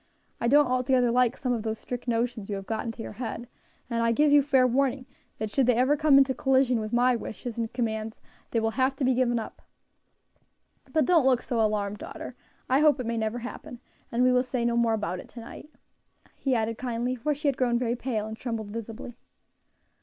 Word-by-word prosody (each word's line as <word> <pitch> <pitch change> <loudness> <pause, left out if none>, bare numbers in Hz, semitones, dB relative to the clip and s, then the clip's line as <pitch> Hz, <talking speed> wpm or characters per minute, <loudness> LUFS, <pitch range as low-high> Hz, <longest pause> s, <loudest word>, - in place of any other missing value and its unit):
I 235 - 0
don't 290 +4 +6
altogether 255 -1 +2
like 250 0 +2
some 250 -2 -1
of 230 - -2
those 220 0 -3
strict 245 +2 -7
notions 230 -3 -1
you 205 - -2
have 195 0 -6
got 220 +2 -3
into 225 0 -5
your - - -7
head, 235 0 -5 0.4
and 235 -2 -1
I 230 - +3
give 295 +5 +3
you 290 0 +7
fair 270 -2 +3
warning, 260 +1 +1 0.3
that 215 -1 -4
should 265 0 +2
they 250 - +4
ever 260 +5 +3
come 300 -2 +5
into 270 -1 +4
collision 260 -3 +2
with 215 0 -4
my 245 +1 +3
wishes 235 0 -6
and 225 -1 -2
commands, 220 -2 -3 0.3
they 230 - 0
will 225 0 0
have 265 +1 +2
to 275 - -3
be 260 - +3
given 245 -1 +1
up. 225 - -6 1.3
But 315 - +2
don't 330 -7 +4
look 255 -2 +3
so 235 -2 -1
alarmed, 210 -1 0
daughter; - - -8 0.3
I 260 +2 +3
hope 300 -2 +4
it 250 - -3
may 230 +1 -2
never 220 +1 -1
happen; 245 0 -8 0.3
and 235 +2 +1
we 255 - +5
will 250 0 +4
say 250 -2 -2
no 235 0 +1
more 235 -1 +2
about 185 -4 -3
it - - -10
to 240 - -10
night," 230 +5 -10 0.7
he 265 -2 0
added, 225 -1 -1
kindly, 245 0 -2
for 285 +4 -1
she 295 +2 -3
had 280 - +2
grown 245 -2 +1
very 240 -1 0
pale 235 -4 -2
and 220 0 -6
trembled 225 -3 -5
visibly. 230 +2 -7
245 Hz, 220 wpm, -27 LUFS, 225-260 Hz, 1.3 s, you